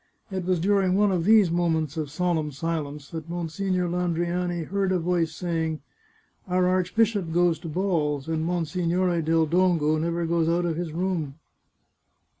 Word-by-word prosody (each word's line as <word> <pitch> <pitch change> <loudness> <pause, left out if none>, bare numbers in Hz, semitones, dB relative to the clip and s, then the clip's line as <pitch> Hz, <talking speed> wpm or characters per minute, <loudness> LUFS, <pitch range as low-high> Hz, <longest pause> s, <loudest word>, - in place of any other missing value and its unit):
It 185 -2 -3
was 185 -1 +1
during 190 0 +2
one 205 0 +3
of 175 -3 0
these 210 -4 +5
moments 160 -3 0
of 155 -3 -3
solemn 160 -1 -1
silence 150 -1 -4
that 160 0 -6
Monsignore 175 +2 -2
Landriani 175 0 -1
heard 195 +3 -1
a 185 - +2
voice 170 -1 0
say 165 0 -2
ing: 160 -1 -3 0.3
" - - -38
Our 180 0 +2
archbishop 185 +1 +1
goes 175 -1 +2
to 170 - -8
balls, 155 -5 -1
and 160 -1 -1
Monsignore 175 +1 0
del 160 0 +2
Dongo 165 -2 +2
never 170 +1 -1
goes 165 -1 +1
out 175 +1 +1
of 165 -2 -1
his 170 -1 -4
room." 165 -4 -2
170 Hz, 165 wpm, -25 LUFS, 160-180 Hz, 0.3 s, these